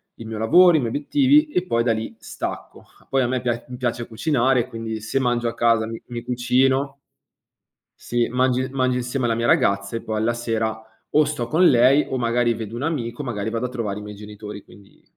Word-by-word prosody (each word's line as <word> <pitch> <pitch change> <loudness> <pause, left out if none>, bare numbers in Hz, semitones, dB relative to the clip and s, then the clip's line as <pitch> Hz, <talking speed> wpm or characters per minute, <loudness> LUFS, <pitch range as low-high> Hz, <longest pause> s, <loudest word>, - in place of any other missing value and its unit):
il 115 - -10
mio 110 -1 -5
lavoro, 175 +12 +6
i 155 - +4
miei 120 -3 -1
obiettivi 280 - +3
e 180 -11 -1
poi 115 -8 +1
da 115 -2 +2
lì 110 0 -5
stacco. - - -7 0.3
Poi 135 -1 +2
a 125 - +1
me 130 0 -1
pia 120 -1 -2
mi 125 - -7
piace 120 -1 -2
cucinare, 125 0 +1
quindi 115 -2 -5
se 110 +5 -3
mangio 120 -2 0
a 115 - -2
casa, 115 -1 +2
mi 115 0 -7
mi 120 -1 -6
cucino. 130 +3 +1 1.1
Sì. 120 -1 0
Mangi 130 +1 +1
mangio 130 -1 0
insieme 125 +1 -2
alla 115 - +1
mia 115 +1 -1
ragazza 100 +2 +2
e 115 - -4
poi 110 -1 -3
alla 115 +2 +1
sera, 110 -2 -2 0.3
o 155 - +4
sto 140 -5 -3
con 170 +7 +4
lei 130 +4 +5
o 130 - -2
magari 120 0 +1
vedo 110 0 -6
un 120 - -4
amico, 140 -4 -3
magari 110 -4 -3
vado 115 +2 -2
a - - -3
trovare 105 -5 -3
i - - -6
miei 105 0 -8
genitori, 105 0 -9
quindi 100 -1 -19
120 Hz, 215 wpm, -22 LUFS, 115-130 Hz, 1.1 s, lavoro